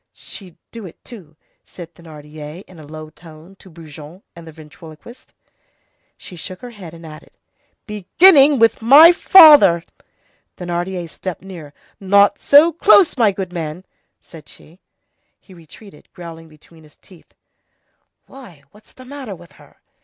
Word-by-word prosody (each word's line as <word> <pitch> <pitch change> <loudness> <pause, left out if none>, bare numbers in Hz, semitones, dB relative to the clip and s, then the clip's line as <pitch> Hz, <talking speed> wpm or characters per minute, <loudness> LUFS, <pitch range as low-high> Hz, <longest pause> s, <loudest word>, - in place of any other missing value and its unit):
"She'd 185 -5 -13
do 225 -4 -11
it, 170 - -17
too," 180 -11 -15 0.3
said 170 -2 -14
Thénardier 155 0 -13
in 180 -3 -19
a 150 - -15
low 155 0 -12
tone 165 +3 -18
to 190 - -19
Brujon 160 +1 -15
and 170 -1 -15
the - - -12
ventriloquist. 155 +8 -17 0.9
She 185 - -14
shook 180 +2 -11
her 245 - -11
head 180 -7 -13
and 165 0 -15
added:— 155 -1 -15 0.5
"Beginning 275 - +3
with 230 -1 +1
my 285 +9 +7
father!" 300 - +5 0.7
Thénardier 175 0 -6
stepped 180 +2 -9
nearer. 170 -6 -12 0.3
"Not 200 +1 +1
so 305 +4 +3
close, 370 +1 +3
my 230 -6 +1
good 185 -2 -8
man!" 165 +1 -8 0.3
said 155 -3 -17
she. 165 +4 -20 0.6
He 190 - -20
retreated, 170 +1 -18
growling 165 -2 -13
between 160 +1 -22
his 150 -1 -23
teeth:— 180 -4 -23 0.9
"Why, 200 - -17
what's 210 +1 -23
the 255 - -17
matter 260 -6 -10
with 170 0 -19
her?" - - -23
180 Hz, 145 wpm, -16 LUFS, 160-215 Hz, 0.9 s, my